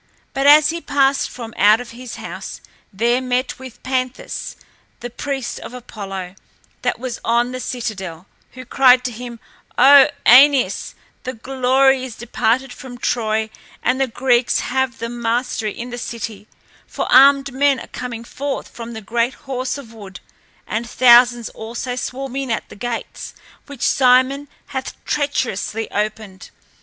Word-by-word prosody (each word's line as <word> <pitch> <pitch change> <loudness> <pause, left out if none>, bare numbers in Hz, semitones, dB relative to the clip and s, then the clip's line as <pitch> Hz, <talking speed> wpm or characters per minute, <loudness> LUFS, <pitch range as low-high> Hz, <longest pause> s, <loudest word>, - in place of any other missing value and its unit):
But 275 +1 +1
as 300 +1 +7
he 335 0 -5
passed 275 -2 +1
from 230 -3 -9
out 210 +3 +5
of 245 - -8
his 245 +1 -9
house - - -8 0.3
there 235 +5 +1
met 255 0 -1
him 260 -1 -10
Panthus, 255 -1 -3 0.4
the 245 0 -7
priest 270 +1 -4
of 250 - -9
Apollo 195 -6 -7 0.5
that - - -1
was 250 0 -5
on 240 +1 +1
the 255 - -5
citadel, 195 -9 -5 0.3
who 255 0 -10
cried 250 0 +5
to 250 - -2
him, 235 0 -8 0.4
"O 275 0 +8 0.2
Æneas, 260 -4 +5 0.3
the 255 - -4
glory 265 +2 +2
is 255 -4 -7
departed 240 +2 -1
from 250 -2 -10
Troy 220 -3 -1 0.3
and 255 +3 +1
the 270 - +2
Greeks 245 0 +1
have 265 0 -1
the 230 - -4
mastery 235 -1 -2
in 245 +1 -6
the 240 - -5
city; 220 -3 -6 0.4
for - - -3
armed 275 0 +6
men 275 0 +2
are - - -8
coming 240 -2 -7
forth 275 +3 -5
from 235 0 -9
the 220 - -7
great 235 +4 -1
horse 260 0 -3
of 240 -5 -11
wood 200 -4 -11 0.5
and 230 +2 -3
thousands 240 -1 +5
also 235 +3 -6
swarm 260 +1 -5
in 270 -2 -3
at 225 - -2
the - - -11
gates, 235 +2 -6 0.3
which 285 -4 -8
Sinon 260 +2 +3 0.2
hath 265 -2 -5
treacherously 255 -6 -2
opened." 210 -2 -4
245 Hz, 150 wpm, -19 LUFS, 230-265 Hz, 0.5 s, O